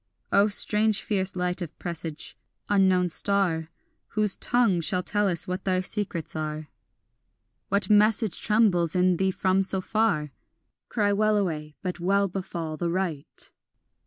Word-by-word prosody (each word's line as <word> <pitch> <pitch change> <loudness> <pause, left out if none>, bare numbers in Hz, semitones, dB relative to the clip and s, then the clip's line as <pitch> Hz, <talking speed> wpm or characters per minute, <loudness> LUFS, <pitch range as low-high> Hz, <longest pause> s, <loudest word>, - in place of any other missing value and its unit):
O 200 +1 +4
strange 210 +1 +2
fierce 190 -2 -2
light 180 0 -2
of 170 -3 -7
presage, 165 -3 -5 0.3
unknown 190 -3 +3
star, 175 -3 +1 0.4
Whose 210 -2 +7
tongue 235 -8 +1
shall 180 +3 -1
tell 205 +3 0
us 175 -2 +1
what 185 +1 -4
thy 185 -1 0
secrets 185 -4 -3
are, 155 -1 -5 1.0
What 200 -1 +2
message 210 -1 +2
trembles 195 -7 +1
in 180 -1 +2
thee 190 +1 +1
from 190 0 0
so 190 0 -1
far? 185 -7 -1 0.6
Cry 205 -3 0
wellaway, 195 -8 -1
but 180 -2 -4
well 200 +3 +1
befall 170 -4 -6
the 170 +1 -2
right. 170 -5 -4
185 Hz, 135 wpm, -25 LUFS, 170-205 Hz, 1.0 s, Whose